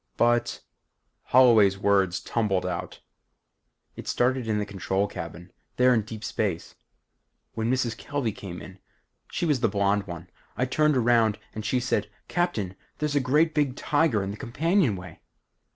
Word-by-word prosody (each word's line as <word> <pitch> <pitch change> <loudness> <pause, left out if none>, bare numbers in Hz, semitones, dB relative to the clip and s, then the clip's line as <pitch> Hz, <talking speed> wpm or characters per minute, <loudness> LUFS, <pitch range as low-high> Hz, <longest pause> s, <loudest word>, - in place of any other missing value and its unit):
"But 120 0 +2 0.3
" - - -50
Holloway's 115 -6 +6
words 100 -2 +2
tumbled 105 -6 0
out. 90 -2 -5 0.9
"It - - -9
started 125 -1 +1
in 110 -1 +1
the 105 - -1
control 100 -1 -1
cabin 90 -2 -8 0.2
there 125 0 +5
in 115 - +3
deep 110 +1 -9
space. 100 -7 -2 0.8
When 115 +1 -1
Mrs. 125 -3 0
Kelvey 140 -2 -2
came 95 -3 -8
in. 95 0 -12 0.5
She - - -1
was 150 -5 +2
the 115 -2 +2
blonde 100 0 +1
one. 85 -1 -7 0.3
I 125 - +1
turned 150 +2 +2
around 115 -3 +3 0.2
and 110 - -5
she 125 +4 +1
said, 110 -4 -1 0.2
'Captain, 115 - -1 0.2
there's 150 -1 -1
a - - +5
great 150 +5 +2
big 145 -4 +1
tiger 145 -10 +1
in 95 - -3
the 105 - -7
companionway.'" 125 - 0
115 Hz, 155 wpm, -26 LUFS, 100-130 Hz, 0.9 s, Holloway's